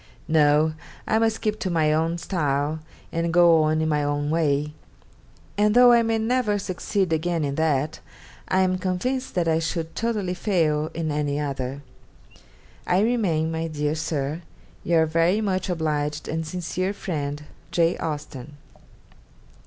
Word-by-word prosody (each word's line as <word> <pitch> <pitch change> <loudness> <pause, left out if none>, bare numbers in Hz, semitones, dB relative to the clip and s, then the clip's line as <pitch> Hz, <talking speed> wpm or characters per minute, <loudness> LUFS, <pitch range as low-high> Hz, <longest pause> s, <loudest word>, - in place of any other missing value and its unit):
No, 155 0 +3 0.3
I 220 - +2
must 225 -1 +1
keep 215 -1 -1
to 200 -5 -2
my 155 -3 +2
own 165 +2 0
style 150 -3 -1 0.3
and 165 0 -1
go 170 -1 +6
on 155 0 +1
in 160 - 0
my 150 -1 +1
own 145 +1 -1
way; 150 -2 +1 0.9
and 210 +1 +3
though 245 0 +8
I 235 -1 +6
may 225 0 +1
never 225 -1 +1
succeed 190 -2 -1
again 165 0 0
in 140 -1 -1
that, 155 0 0 0.5
I 190 0 +2
am 185 0 +1
convinced 245 +9 -2
that 175 -2 +1
I 160 0 +2
should 165 0 -3
totally 215 -5 -1
fail 160 -6 0
in 160 -2 -2
any 145 -1 -1
other. 140 -1 -4 1.0
'I 180 - +3
remain, 190 -9 +1
my 165 0 -2
dear 150 -1 -1
Sir, 155 0 -3 0.4
'Your 165 -1 +3
very 165 +5 +2
much 190 -3 -1
obliged, 150 -3 -2
and 160 0 -3
sincere 185 +3 -2
friend, 145 -7 -4 0.3
'J. 170 0 +2
AUSTEN. 145 -3 -6
165 Hz, 150 wpm, -24 LUFS, 150-185 Hz, 1.0 s, though